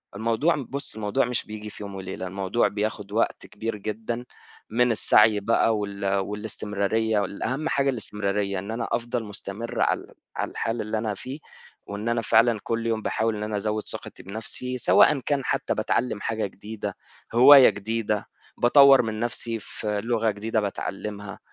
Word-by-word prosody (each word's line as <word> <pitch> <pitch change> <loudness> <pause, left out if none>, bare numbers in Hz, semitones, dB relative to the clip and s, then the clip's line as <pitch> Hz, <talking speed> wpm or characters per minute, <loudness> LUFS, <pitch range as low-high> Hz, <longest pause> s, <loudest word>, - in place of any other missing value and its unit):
الموضوع 115 +10 +1
م 145 - -4
بُصّ 140 -2 -3
الموضوع 110 +5 0
مش 125 -1 -2
بييجي 105 0 -7
في 105 - -9
يوم 100 -1 -7
وليلة، 95 0 -5
الموضوع 95 +5 0
بياخد 105 -1 -3
وقت 115 +2 0
كبير 115 +2 -4
جدًا 110 +4 -4 0.4
من 125 +2 +3
السعي 105 -1 +5
بقى 115 +1 +2
وال 100 -1 -4
والاستمرارية 105 +1 -1
و 100 - +1
الأهم 130 +11 -3
حاجة 140 -2 +2
الاستمرارية، 100 -4 -1
إن 100 +4 -6
أنا 115 +1 -3
أفضل 120 0 -1
مستمر 105 +2 -5
على - - +2
ال - - -15 0.2
على - - -2
الحال 115 +1 -2
اللي 110 +1 -2
أنا 110 -1 -1
فيه، 130 +9 -7 0.5
وإن 105 +3 -4
أنا 115 0 +1
فعلًا 115 0 +4
كلّ 115 0 -2
يوم 110 -1 0
باحاول 110 0 0
إن 105 - -4
أنا 105 -1 -2
أزوّد 105 +1 -1
ثقتي - - -7
بنفْسي، 110 +5 -3
سواءً 130 +3 +5
كان 135 +1 -1
حتّى - - 0
باتعلّم 120 -4 0
حاجة 110 -2 -1
جديدة 105 +3 -7 0.4
هواية 135 +2 +9
جديدة 105 0 -2 0.3
باطوّر 140 +2 +7
من 110 -2 -4
نفْسي 115 -1 -2
في 105 0 -4
لغة 115 -1 +1
جديدة 110 +2 -1
باتعلّمها، 100 0 -5
110 Hz, 165 wpm, -25 LUFS, 105-115 Hz, 0.5 s, هواية